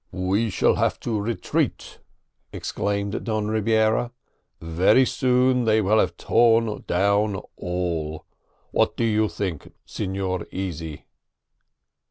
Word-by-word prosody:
"We 95 Hz, +5 st, 0 dB
shall 90 Hz, -, +2 dB
have -, -, 0 dB
to 110 Hz, -4 st, -2 dB
retreat!" 105 Hz, -2 st, -2 dB, 0.5 s
exclaimed 100 Hz, 0 st, -3 dB
Don 110 Hz, -2 st, -1 dB
Rebiera; 110 Hz, +2 st, +2 dB, 0.5 s
"very 90 Hz, +10 st, +3 dB
soon 125 Hz, -1 st, +2 dB
they 110 Hz, 0 st, +3 dB
will 110 Hz, +1 st, +3 dB
have 90 Hz, -4 st, 0 dB
torn 115 Hz, -2 st, +2 dB
down 100 Hz, +3 st, +2 dB, 0.2 s
all. 85 Hz, -4 st, -3 dB, 0.5 s
What -, -, +1 dB
do -, -, 0 dB
you 110 Hz, -1 st, +2 dB
think, 95 Hz, -7 st, -5 dB
Signor 95 Hz, -1 st, -3 dB
Easy?" 80 Hz, -5 st, -5 dB
100 Hz, 110 wpm, -24 LUFS, 90-110 Hz, 0.5 s, very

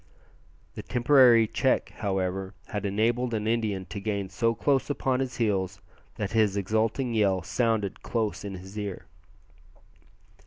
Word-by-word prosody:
The -, -, -6 dB
temporary 120 Hz, -2 st, +5 dB
check, -, -, +1 dB
however, 95 Hz, -1 st, -2 dB
had 105 Hz, -2 st, -2 dB
enabled 115 Hz, +4 st, 0 dB
an 105 Hz, -1 st, -2 dB
Indian 110 Hz, -4 st, 0 dB
to 105 Hz, -, -5 dB
gain 100 Hz, -2 st, -2 dB
so 115 Hz, +4 st, 0 dB
close 140 Hz, +1 st, +1 dB
upon 135 Hz, -2 st, 0 dB
his 130 Hz, -1 st, -3 dB
heels 95 Hz, -4 st, 0 dB, 0.4 s
that 105 Hz, -4 st, -3 dB
his 110 Hz, -3 st, +2 dB
exulting 110 Hz, +5 st, 0 dB
yell 100 Hz, -5 st, +2 dB
sounded 105 Hz, +2 st, -1 dB
close 110 Hz, -4 st, -2 dB
in 100 Hz, -1 st, -5 dB
his 95 Hz, +3 st, -8 dB
ear. 100 Hz, -3 st, -5 dB
105 Hz, 140 wpm, -27 LUFS, 95-115 Hz, 0.4 s, temporary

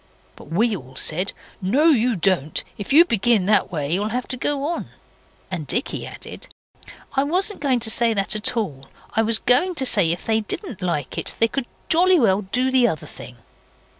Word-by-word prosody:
But -, -, -14 dB
we 205 Hz, +9 st, 0 dB
all 130 Hz, -6 st, -11 dB
said 180 Hz, +8 st, 0 dB, 0.3 s
'No, 225 Hz, +11 st, +1 dB
you 245 Hz, -5 st, +2 dB
don't 175 Hz, -5 st, 0 dB
if 205 Hz, -, -7 dB
you 325 Hz, +5 st, +7 dB
begin 225 Hz, -, +1 dB
that 205 Hz, -1 st, +2 dB
way 150 Hz, -2 st, -2 dB
you'll 205 Hz, +4 st, -1 dB
have 250 Hz, +3 st, -3 dB
to 255 Hz, -, -2 dB
go 280 Hz, +2 st, -1 dB
on.' 335 Hz, +4 st, -3 dB, 0.6 s
And 165 Hz, -6 st, -5 dB
Dicky 245 Hz, -, -1 dB
added, -, -, -11 dB, 0.7 s
'I 275 Hz, 0 st, +1 dB
wasn't 380 Hz, +7 st, -1 dB
going 270 Hz, -4 st, +1 dB
to 220 Hz, -, +1 dB
say 235 Hz, 0 st, +2 dB
that 195 Hz, +1 st, 0 dB
at 215 Hz, +3 st, +2 dB
all. 140 Hz, -12 st, -4 dB, 0.3 s
I 225 Hz, -, +2 dB
was 225 Hz, 0 st, +2 dB
going 335 Hz, +12 st, +3 dB
to 265 Hz, -, 0 dB
say 200 Hz, -9 st, +4 dB
if 175 Hz, -, -4 dB
they 220 Hz, 0 st, +1 dB
didn't 215 Hz, -, -5 dB
like 150 Hz, -7 st, -3 dB
it -, -, -2 dB
they 230 Hz, -, +3 dB
could 245 Hz, +1 st, -4 dB, 0.2 s
jolly 360 Hz, +3 st, +4 dB
well 200 Hz, -5 st, +2 dB
do 250 Hz, +7 st, -1 dB
the 255 Hz, -2 st, +4 dB
other 160 Hz, -9 st, -4 dB
thing. 125 Hz, -, -12 dB
220 Hz, 195 wpm, -21 LUFS, 185-260 Hz, 0.7 s, you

